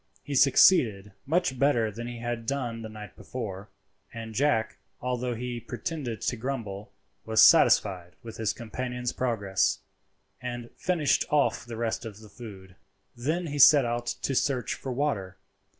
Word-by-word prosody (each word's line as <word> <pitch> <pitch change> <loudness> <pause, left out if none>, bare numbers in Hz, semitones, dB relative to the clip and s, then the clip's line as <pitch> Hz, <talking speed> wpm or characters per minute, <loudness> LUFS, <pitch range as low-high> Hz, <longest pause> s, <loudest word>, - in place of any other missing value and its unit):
He 145 - -6
succeeded 125 - +5 0.2
much 160 -4 0
better 120 -6 +2
than 120 +3 -7
he 120 0 -6
had 120 -1 -4
done 120 -4 -2
the 110 - -7
night 105 -1 -10
before, 105 -5 -7 0.4
and 115 -1 -7
Jack, 110 -4 +1 0.2
although 125 -1 -2
he 120 +1 -4
pretended 120 0 -5
to - - -1
grumble, 110 -5 -5 0.3
was 110 0 0
satisfied 90 -4 +5
with 115 -1 -9
his 110 -2 0
companion's 125 +1 -4
progress, 100 -6 0 0.6
and 120 -1 -6
finished 170 -5 +1
off 145 -5 +1
the 115 -1 -7
rest 115 0 -2
of 110 -3 -8
the 110 -1 -14
food. 95 -6 -11 0.4
Then 155 +9 -2
he 145 -2 -4
set 140 -1 +8
out 120 0 -2 0.2
to 135 - 0
search 130 -1 0
for 130 - -6
water. 115 -9 -2
120 Hz, 150 wpm, -27 LUFS, 110-130 Hz, 0.6 s, set